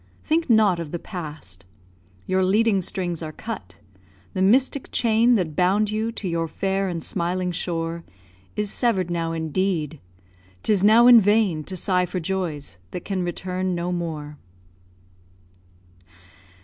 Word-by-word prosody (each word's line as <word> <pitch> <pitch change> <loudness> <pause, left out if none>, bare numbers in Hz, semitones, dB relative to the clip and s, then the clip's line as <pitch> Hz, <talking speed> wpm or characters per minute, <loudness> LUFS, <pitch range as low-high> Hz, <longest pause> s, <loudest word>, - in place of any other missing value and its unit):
Think 320 -1 0
not 215 -6 +4
of 165 -3 -5
the 175 - -3
past; 155 - -8 0.6
Your 185 0 +1
leading 205 +1 +3
strings 175 -3 -3
are 155 -1 -5
cut; 95 - -7 0.6
the 185 - -2
mystic 255 +7 +2
chain 230 +1 +3
That 170 -7 -1
bound 200 +5 +2
you 220 +2 -1
to 205 - -5
your 165 -1 -1
fair 195 +3 -1
and 170 -3 -4
smiling 180 0 -2
shore 170 -1 -3 0.5
Is 210 -1 -1
sever'd 190 -8 0
now, 165 -1 -1
indeed. 160 -1 -1 0.6
'Tis 200 -3 +2
now 220 +3 +7
in 245 -1 +9
vain 205 -6 +2
To 185 - -6
sigh 180 0 +1
for 185 - -3
joys 160 - -4
that 175 - -7
can 195 -2 -2
return 180 +1 -2
no 175 +1 -2
more. 155 -4 -4
185 Hz, 140 wpm, -23 LUFS, 165-205 Hz, 0.6 s, in